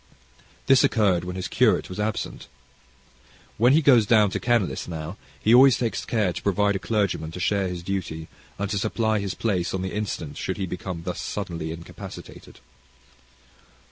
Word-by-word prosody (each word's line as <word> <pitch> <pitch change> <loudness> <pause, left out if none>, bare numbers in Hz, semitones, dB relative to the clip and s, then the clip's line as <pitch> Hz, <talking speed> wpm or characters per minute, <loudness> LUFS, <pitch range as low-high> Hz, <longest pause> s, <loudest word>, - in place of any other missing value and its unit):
This 135 -1 +5
occurred 95 -7 +2
when 90 0 -5
his 95 -2 -3
curate - - +2
was 90 - -8
absent. 105 +1 -3 1.1
When 120 +4 +5
he 155 +2 +4
goes 120 -7 +5
down 105 -3 +4
to - - -2
Kenlis 120 -6 0
now, 80 +1 -5 0.2
he 110 - +3
always 130 +1 +7
takes 115 -2 -2
care 105 -6 0
to - - -6
provide 100 0 +1
a - - -1
clergyman 100 -7 -1
to 90 - -6
share 100 +1 +1
his 90 -1 -5
duty, 85 -4 -4 0.3
and 100 - -2
to 100 - 0
supply 110 +1 0
his 100 -3 -3
place 95 -6 -1
on 95 - -3
the 95 - -4
instant 90 -8 -4
should - - -3
he 95 - -2
become 90 -1 -6
thus 90 +1 -4
suddenly 85 -6 -4
incapacitated. 85 +1 -10
100 Hz, 175 wpm, -24 LUFS, 90-110 Hz, 1.1 s, always